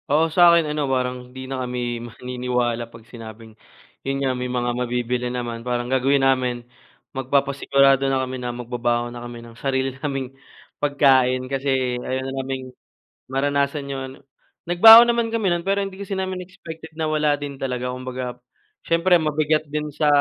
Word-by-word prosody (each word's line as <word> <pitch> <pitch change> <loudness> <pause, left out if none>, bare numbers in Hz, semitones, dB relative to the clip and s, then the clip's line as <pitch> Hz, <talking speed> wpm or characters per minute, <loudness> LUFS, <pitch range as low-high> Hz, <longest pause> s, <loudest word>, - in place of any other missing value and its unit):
Oo, 150 +3 +4
sa 175 - +6
akin 170 -1 +5
ano 150 - -2
parang 125 -1 0
hindi 130 +1 -10
na 135 - -3
kami 125 0 -4 0.3
maniniwala 125 0 -2
pag 115 -1 -13
sinabing 115 -1 -10 0.5
yun 135 0 -1
nga 130 - +2
may 125 0 -3
mga 120 0 0
mabibili 125 0 -1
naman 120 -2 -4
parang 120 0 -2
gagawin 135 +1 +2
namin 130 -2 +2 0.6
magpapasigurado 135 0 +2
na 135 - +1
kami 130 0 -6
na 125 - -3
magbabaon 120 0 -1
na 120 - -8
kami 120 0 -8
ng 115 - -13
sarili 135 -1 0
naming 135 -3 -2 0.5
pagkain 130 -3 +3
kasi 130 -2 0
ayaw 130 0 -1
na 135 - -4
naming 130 0 -4 0.7
maranasan 140 +1 -1
yun, 135 -1 -5 0.5
nagbaon 225 +7 +9
naman 235 -1 +1
kami 220 -5 0
nun 175 - -1
pero 200 0 +1
hindi 195 0 -9
kasi 195 -1 -4
namin 190 -1 -3
expected 160 -3 -11
na 160 - -1
wala 150 -1 +1
din 140 -1 -7
talaga 125 -1 -2
kumbaga 125 -1 -6 0.5
siyempre 170 +1 +4
mabigat 155 0 +1
din 150 0 -3
sa 150 +1 0
135 Hz, 165 wpm, -22 LUFS, 125-150 Hz, 0.7 s, nagbaon